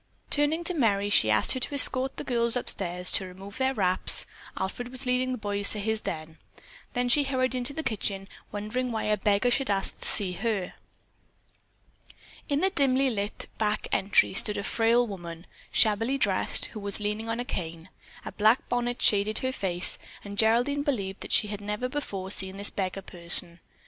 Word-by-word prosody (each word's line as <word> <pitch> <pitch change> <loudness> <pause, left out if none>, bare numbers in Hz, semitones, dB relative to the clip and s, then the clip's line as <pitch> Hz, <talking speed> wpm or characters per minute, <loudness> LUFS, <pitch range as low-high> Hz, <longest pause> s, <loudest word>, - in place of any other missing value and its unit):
Turning 295 +3 +2
to 360 - -1
Merry, 205 - +1
she 110 - +4
asked 110 - +5
her 260 - +3
to 285 - -3
escort 265 -1 +6
the - - -4
girls 235 -1 +2
upstairs 180 -6 0
to 190 - +1
remove 195 +4 -11
their 265 0 +2
wraps 185 -3 +3 0.3
(Alfred 220 +6 -4
was 255 +1 -4
leading 250 +1 0
the 255 - -2
boys 205 -2 -2
to 210 - -1
his 220 +1 -1
den), 160 0 -6 0.5
then 245 0 0
she 285 +4 +4
hurried 260 -1 0
into 250 +2 -1
the 320 +3 -5
kitchen 200 -5 -2 0.2
wondering 220 +5 -3
why 220 -1 -2
a 215 - +1
beggar 210 +4 +1
should 270 0 0
ask 195 -1 -1
to - - +1
see 195 -4 +4
her. 195 0 -2 1.8
In 285 +1 +1
the 385 - +2
dimly 270 -5 +2
lighted 205 -2 -3
back 215 -1 -1
entry 195 0 +3
stood 210 +2 +2
a 205 - -3
frail 230 +3 +2
woman, 175 -5 -8 0.3
shabbily 225 +5 +2
dressed, 200 -8 +1
who 215 - -6
was 200 0 -3
leaning 210 +2 -3
on 230 +1 -2
a 245 - -3
cane. 165 -5 -6 0.4
A - - -5
black 220 +4 +2
bonnet 245 0 -1
shaded 210 +1 +3
her 260 - -1
face, 185 -7 -1 0.2
and 200 0 -8
Geraldine 240 +7 +2
believed 205 -10 -3
that - - -8
she 210 - +3
had 205 -1 -6
never 210 +4 -3
before 200 -9 -5
seen 190 -1 -2
this 200 +1 -1
beggar 195 0 -3
person. 170 -1 -2
215 Hz, 185 wpm, -27 LUFS, 195-250 Hz, 1.8 s, escort